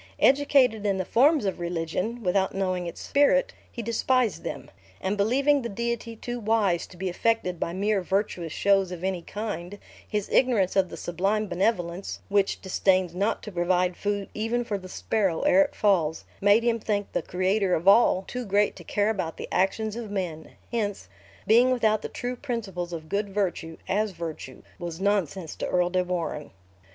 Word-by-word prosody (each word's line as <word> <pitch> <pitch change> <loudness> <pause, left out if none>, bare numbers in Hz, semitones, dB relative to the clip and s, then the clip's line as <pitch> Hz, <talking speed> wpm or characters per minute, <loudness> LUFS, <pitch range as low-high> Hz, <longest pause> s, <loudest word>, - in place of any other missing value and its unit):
Educated 270 -5 +4
in 200 -2 +1
the 185 - -2
forms 280 - +4
of 190 - -2
religion, 175 +7 -3
without 190 +1 +1
knowing 185 -2 -1
its 170 - -7
spirit, - - +2 0.2
he 235 - -6
despised 230 -3 +1
them; - - -6 0.3
and 190 +2 -1
believing 270 +8 +3
the 235 - -4
Deity 235 +2 -3
too 240 +2 -5
wise 210 -6 +1
to 180 - -15
be 190 +2 -3
affected 180 -1 0
by - - -2
mere 200 +2 0
virtuous 180 -3 -1
shows 195 +1 +2
of 180 -1 -7
any 190 -2 -1
kind, 205 -1 -5 0.3
his 210 -2 -2
ignorance 230 -8 +2
of 190 -2 +3
the - - -8
sublime 195 +5 -1
benevolence, 180 -1 -1
which 200 -1 +1
disdains 185 -2 +2
not 200 +5 -1
to 210 - -7
provide 180 0 +1
food 205 0 -2
even 225 +3 -1
for 205 -4 -3
the 185 0 -11
"sparrow 195 -4 0
ere 290 0 +5
it 290 - 0
falls," 170 -7 +1 0.2
made 205 +3 +5
him 235 -1 +1
think 205 -2 -2
the - - -1
Creator 185 +2 +1
of 170 +4 -4
all 195 -2 +6
too 250 0 -4
great 205 -1 +1
to 175 - -10
care 205 +5 +1
about 170 -6 -3
the - - -6
actions 210 +3 0
of 235 -2 -6
men; 175 -6 -4 0.2
hence, 210 -4 -2 0.4
being 235 +4 +5
without 220 -4 +2
the - - -5
true 245 0 -4
principles 210 -10 -4
of 160 -2 -6
good 200 +4 -1
virtue, 180 -5 -2
as 215 +2 +1
virtue, 165 -6 -7 0.2
was 170 -2 -5
nonsense 190 -4 -1
to - - -3
Earl 180 0 +1
de 185 0 +2
Warenne. 170 -4 -3
200 Hz, 180 wpm, -26 LUFS, 180-225 Hz, 0.4 s, all